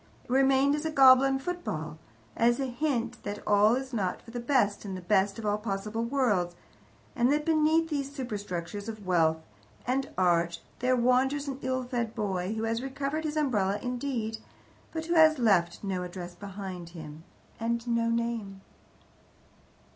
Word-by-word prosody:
It - - -12
remained 270 +1 +4
as 300 +1 -1
a 320 - -1
goblin 270 -2 +6
football, 265 - -4 0.4
as 240 +2 +3
a 270 - 0
hint 245 -2 -2
that 205 0 -4
all 210 +2 +5
is 265 0 -5
not 190 -5 -1
for 230 - -12
the 240 - -4
best 235 -5 +1
in 195 -2 -5
the - - -5
best 195 +1 +2
of 225 - -6
all 205 0 +1
possible 210 +1 -3
worlds, 225 -9 +1 0.6
and 245 +2 +3
that 300 +1 +1
beneath 320 +1 +3
these 280 -2 -2
superstructures 205 - -5
of 215 -3 -8
wealth 165 -3 +3 0.5
and 265 +2 0
art 170 -2 +2 0.2
there 255 +1 +2
wanders 260 +4 +2
an 270 -1 -4
ill 260 0 -1
fed 240 -2 -3
boy, 195 -2 -2
who 220 - -3
has 225 +1 -1
recovered 280 +4 -3
his 305 0 -2
umbrella 210 -9 +1
indeed, 245 -2 -3 0.5
but 320 -1 -4
who 340 - -1
has 315 -2 +6
left 195 -9 +2
no 190 -2 -2
address 180 0 -7
behind 190 -2 -7
him, 155 0 -9 0.4
and 235 +1 -2
no 230 -1 +1
name. 230 -4 -2
235 Hz, 165 wpm, -29 LUFS, 195-270 Hz, 0.6 s, goblin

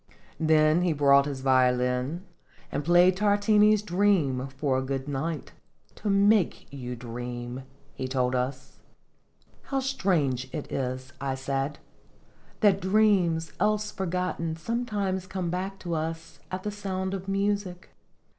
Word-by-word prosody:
Then 155 +1 +4
he 175 -2 +2
brought 140 -1 +5
his 135 -2 -4
violin, 130 +5 +1 0.5
and 145 - -2
played 175 +3 +5
Tar 205 0 +3
tini's 210 0 +4
"Dream" 175 -10 +1
for 140 -2 +1
a - - -2
good 135 +1 -3
night 145 +1 -3 0.4
"to 210 - -4
make 200 -1 +3
you 125 -3 -5
dream," 120 +1 -6 0.3
he 130 - -4
told 130 -1 0
us. 130 +1 -3 0.4
" - - -35
How 275 - +1
strange 170 - 0
it 150 - -6
is," 130 0 -3
I 135 -1 -1
said, 135 +2 -2 0.4
" - - -31
that 200 -2 +4
dreams 185 -5 +2
else 210 0 +1
forgotten 180 -3 -2
sometimes 200 -1 -2
come 185 -3 -3
back 190 +2 -3
to 175 -2 -4
us 165 +1 -4
at 185 0 -5
the 210 - -2
sound 190 -2 -3
of 190 0 -5
music." 195 -2 -2
165 Hz, 140 wpm, -27 LUFS, 135-195 Hz, 0.5 s, brought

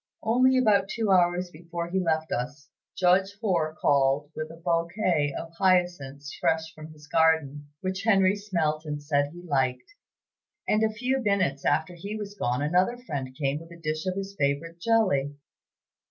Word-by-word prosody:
Only 255 +4 +4
about 205 -6 +3
two 220 -3 -1
hours 175 -1 +3
before 170 +1 -6
he 190 - +1
left 160 -3 0
us, 130 +4 -4 0.3
Judge 190 +2 +3
Hoar 170 -8 0
called 140 +1 +2
with 155 0 -4
a 165 - -10
bouquet 170 -2 0
of 165 - -7
hyacinths 175 -7 +1
fresh 160 0 0
from 155 0 -11
his 150 -1 -15
garden, 150 -2 +2
which 190 0 -3
Henry 195 -2 +4
smelt 165 -7 -1
and 150 -2 -4
said 145 -1 +1
he 175 +2 -11
liked, 135 - -1 0.7
and 215 - +2
a 220 - +3
few 250 +5 -1
minutes 190 - 0
after 160 +3 +1
he 200 +5 -6
was 205 -1 -6
gone 125 -8 -1
another 180 +10 +2
friend 140 - -5
came 140 0 0
with 165 +1 -13
a 170 - -11
dish 155 +2 -3
of 185 - -1
his 195 0 -5
favorite 145 +5 -1
jelly. 175 -10 +2
170 Hz, 170 wpm, -27 LUFS, 150-195 Hz, 0.7 s, Only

